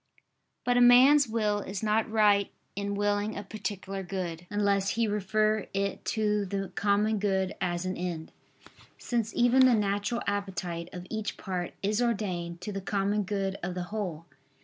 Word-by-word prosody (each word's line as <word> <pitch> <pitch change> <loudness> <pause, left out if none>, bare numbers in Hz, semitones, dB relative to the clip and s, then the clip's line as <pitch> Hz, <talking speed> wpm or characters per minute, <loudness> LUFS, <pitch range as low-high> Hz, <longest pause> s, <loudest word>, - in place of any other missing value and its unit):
But 245 0 +3
a - - +5
man's 260 +4 +7
will 215 -2 0
is 195 0 -5
not 215 +1 +1
right 210 -2 +4 0.3
in 200 0 -2
willing 205 +1 0
a 205 - -4
particular 195 -1 -5
good, 175 -2 -5
unless 200 -1 +1
he 230 -1 +2
refer 215 +1 +1
it 200 0 -1
to 210 -1 +1
the 195 0 -3
common 210 +1 +1
good 190 -2 0
as 175 0 -1
an 185 - -2
end: 170 -3 -4 0.7
since 230 -3 -2
even 255 +2 +5
the 250 - +5
natural 205 +3 0
appetite 180 -4 -3
of 180 0 -8
each 220 -2 -3
part 180 -2 -4
is 210 +4 +1
ordained 185 -7 -2
to 210 - -4
the 195 -1 -4
common 200 +1 0
good 195 0 -2
of 180 0 -4
the 180 - -2
whole. 175 -7 -3
200 Hz, 165 wpm, -29 LUFS, 190-215 Hz, 0.7 s, man's